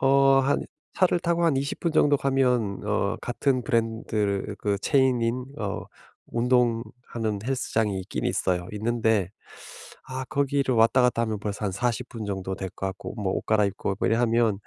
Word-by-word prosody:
어 - - -1
어 135 0 +5
한 135 +2 +1 0.3
차를 180 -1 +2
타고 170 0 +1
한 155 -5 +3
20 140 +2 -3
분 170 - 0
정도 145 -2 +4
가면 125 -8 +1
어 105 0 0
같은 130 +1 0
브랜드를 110 -3 -1
그 100 -1 -1
체인인 125 -1 +2
어 105 -2 -3 0.5
운동하는 120 -2 0
헬스장이 115 -6 0
있긴 95 - -5
있어요 90 -1 0
있는데 110 -3 +1 0.8
아 130 0 -4
거기를 140 -3 +1
왔다 115 +3 +5
갔다 125 -1 +2
하면 110 -2 -2
벌써 105 +1 -4
한 100 - -1
40 120 +4 -1
분 110 -2 -6
정도 95 -1 -3
될 95 0 -5
것 95 - -5
같고 95 0 -7
뭐 100 -4 -2
옷 - - -3
갈아입고 100 -2 +1
뭐 - - +1
이래 115 - +3
하면 115 -2 +3
115 Hz, 295 characters per minute, -26 LUFS, 105-130 Hz, 0.8 s, 어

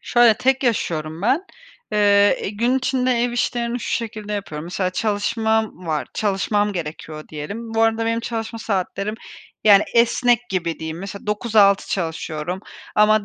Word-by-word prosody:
Şöyle, 240 -2 +5
tek 265 +3 +1
yaşıyorum 165 -8 -1
ben. 270 - +2 0.5
Eee, 205 -1 +4
gün 235 +5 +1
içinde 260 -1 0
ev 240 0 0
işlerini 240 0 -1
şu - - -5
şekilde 215 -2 -3
yapıyorum. 165 -7 -4
Mesela 185 +1 -2
çalışmam 220 -1 -1
var, 155 -2 -1
çalışmam 205 0 0
gerekiyor 155 -3 -6
diyelim. 205 +10 -6
Bu 225 - +3
arada 225 0 +2
benim 230 0 0
çalışma 230 0 -4
saatlerim, 200 0 -2 0.5
yani, 205 -1 +7
esnek 240 +1 +4
gibi 170 -3 -2
diyeyim. 160 +1 -5
Mesela 200 +2 -8
9-6 210 -2 +3
çalışıyorum 165 0 -3 0.3
ama 210 0 +4
210 Hz, 140 wpm, -21 LUFS, 185-230 Hz, 0.5 s, yani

